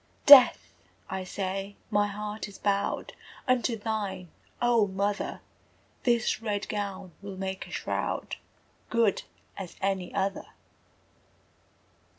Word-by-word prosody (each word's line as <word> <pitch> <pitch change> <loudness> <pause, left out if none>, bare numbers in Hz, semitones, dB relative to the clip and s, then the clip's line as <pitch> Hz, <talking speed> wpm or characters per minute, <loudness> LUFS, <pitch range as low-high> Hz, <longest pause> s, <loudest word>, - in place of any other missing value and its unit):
Death, 280 -3 +9 0.4
I 190 0 -3
say, 195 +1 -4 0.2
my 205 0 +3
heart 210 +1 -5
is 200 - -12
bowed 200 -1 -1 0.3
Unto 250 -2 +2
thine, 205 -4 -3 0.3
O 235 -3 +3
mother! 200 +2 -2 0.6
This 235 -2 +2
red 205 -3 -2
gown 200 -4 -4
will 200 -1 -7
make 190 0 -4
a - - -13
shroud - - -3 0.5
Good 230 -4 +2 0.4
as 190 -3 -7
any 190 -2 -1
other! 195 0 -2
200 Hz, 110 wpm, -28 LUFS, 195-215 Hz, 0.6 s, Death